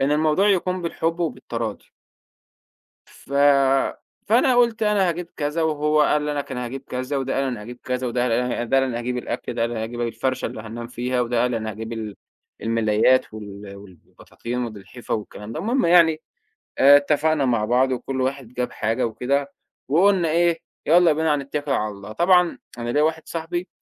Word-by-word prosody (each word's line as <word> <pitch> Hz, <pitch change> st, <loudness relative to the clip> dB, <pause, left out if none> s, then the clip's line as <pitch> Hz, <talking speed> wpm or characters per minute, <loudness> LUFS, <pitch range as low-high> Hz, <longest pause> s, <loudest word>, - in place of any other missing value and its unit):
إن 135 Hz, +2 st, +2 dB
الموضوع 155 Hz, +6 st, +3 dB
يكون 185 Hz, -1 st, +1 dB
بالحب، 165 Hz, 0 st, -2 dB
وبالتراضي. 115 Hz, -9 st, -4 dB, 1.1 s
ف 140 Hz, -, -14 dB, 0.9 s
فأنا 245 Hz, +4 st, +4 dB
قُلت: 235 Hz, -2 st, +3 dB
"أنا 205 Hz, -4 st, +2 dB
هاجيب 170 Hz, +1 st, -4 dB
كذا."، 150 Hz, +2 st, -1 dB
وهو 150 Hz, -1 st, +2 dB
قال 150 Hz, 0 st, +2 dB
لك: 145 Hz, -1 st, -3 dB
"أنا 125 Hz, -1 st, -3 dB
هاجيب 135 Hz, +3 st, -6 dB
كذا."، 130 Hz, +3 st, -3 dB
وده 135 Hz, 0 st, -2 dB
قال: 135 Hz, -, +1 dB
"أنا 125 Hz, -5 st, -3 dB
هاجيب 120 Hz, +3 st, -9 dB
كذا."، 125 Hz, 0 st, -2 dB
وده 120 Hz, +1 st, -1 dB
قال: 125 Hz, -, 0 dB
"أنا 125 Hz, +2 st, +2 dB
ه" 125 Hz, -, -2 dB
وده 135 Hz, +3 st, +2 dB
قال: -, -, +2 dB
"أنا 120 Hz, -1 st, -3 dB
هاجيب 125 Hz, +1 st, -3 dB
الأكل."، 120 Hz, -, -4 dB
ده 115 Hz, -, -3 dB
قال: 115 Hz, +1 st, 0 dB
"أنا 110 Hz, -2 st, -3 dB
هاجيب 120 Hz, +2 st, -5 dB
الفَرشَة 120 Hz, +3 st, -2 dB
اللي -, -, -5 dB
هاننام 115 Hz, +2 st, -7 dB
فيها."، 125 Hz, +1 st, -2 dB
وده 120 Hz, 0 st, 0 dB
قال: 125 Hz, -1 st, +1 dB
"أنا 110 Hz, -1 st, -3 dB
هاجيب 110 Hz, +2 st, -6 dB
ال 110 Hz, -3 st, -6 dB, 0.5 s
الملايات، 115 Hz, +2 st, +2 dB
وال 100 Hz, -1 st, -9 dB
والبطاطين، 100 Hz, +5 st, -8 dB
والالحفة 110 Hz, +1 st, -7 dB
والكلام 105 Hz, 0 st, -6 dB
ده.". 155 Hz, -, -4 dB
المهم 235 Hz, +6 st, +1 dB
يعني 165 Hz, -2 st, +5 dB, 0.6 s
آآ، 140 Hz, +1 st, +8 dB
اتفقنا 150 Hz, +1 st, +2 dB
مع 115 Hz, -4 st, +1 dB
بعض، 130 Hz, +3 st, +2 dB
وكلّ 130 Hz, +1 st, -3 dB
واحد 130 Hz, -1 st, -2 dB
جاب 125 Hz, 0 st, -2 dB
حاجة 115 Hz, +3 st, -1 dB
وكده، 140 Hz, +5 st, -1 dB, 0.4 s
وقُلنا 175 Hz, +2 st, +3 dB
إيه: 170 Hz, 0 st, +2 dB, 0.3 s
"يالّا 170 Hz, 0 st, +5 dB
بينا 155 Hz, 0 st, +1 dB
هنتكل 145 Hz, +1 st, -4 dB
على 110 Hz, -5 st, 0 dB
الله.". 100 Hz, +1 st, -10 dB
طبعًا 180 Hz, -, +3 dB, 0.2 s
أنا 120 Hz, 0 st, -3 dB
ليّا 150 Hz, +4 st, +2 dB
واحد 160 Hz, +1 st, 0 dB
صاحبي 175 Hz, +2 st, -4 dB
130 Hz, 185 wpm, -23 LUFS, 115-160 Hz, 1.1 s, آآ